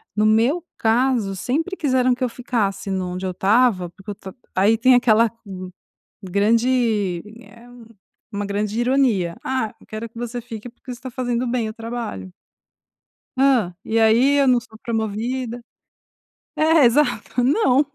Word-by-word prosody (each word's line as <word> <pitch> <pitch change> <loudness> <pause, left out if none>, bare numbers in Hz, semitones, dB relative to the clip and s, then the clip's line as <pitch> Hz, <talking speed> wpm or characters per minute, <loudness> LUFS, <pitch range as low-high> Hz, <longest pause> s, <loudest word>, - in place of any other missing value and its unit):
No 215 - +2
meu 235 +10 +3
caso 230 -3 +1
sempre 320 - -2
quiseram 255 -3 +2
que 255 - -4
eu 250 - +1
ficasse 225 -5 -2
no 185 -1 -2
onde 185 +1 -5
eu 185 - -1
estava 195 -1 +2
porque 195 +3 -10
eu - - -6
ta 190 -1 -10 0.2
aí 205 +4 +4
tem 255 +2 +5
aquela 230 -2 +4 0.9
grande, 210 -1 +1 0.2
eh, 235 0 -17 0.7
uma 205 0 -3
grande 205 +2 -2
ironia, 240 -9 +1
"ah, 260 -5 -2
eu - - -19
quero 220 +1 -6
que 230 - -14
você 240 0 -4
fique 230 0 -8
porque 250 +1 -10
você 240 - -9
está 260 - -8
fazendo 245 0 -2
bem 235 -2 -1
o 215 - -7
trabalho" 230 - -6 1.1
hã, 255 -10 +3
e 225 +1 +1
aí 235 +6 +4
eu 275 - +3
não 250 -2 +5
sou 220 -2 -16
promovida? 230 +2 -3 0.9
É, 315 -2 +4
exato. 245 -1 +1
Não. 280 - +3
230 Hz, 155 wpm, -21 LUFS, 210-255 Hz, 1.1 s, tem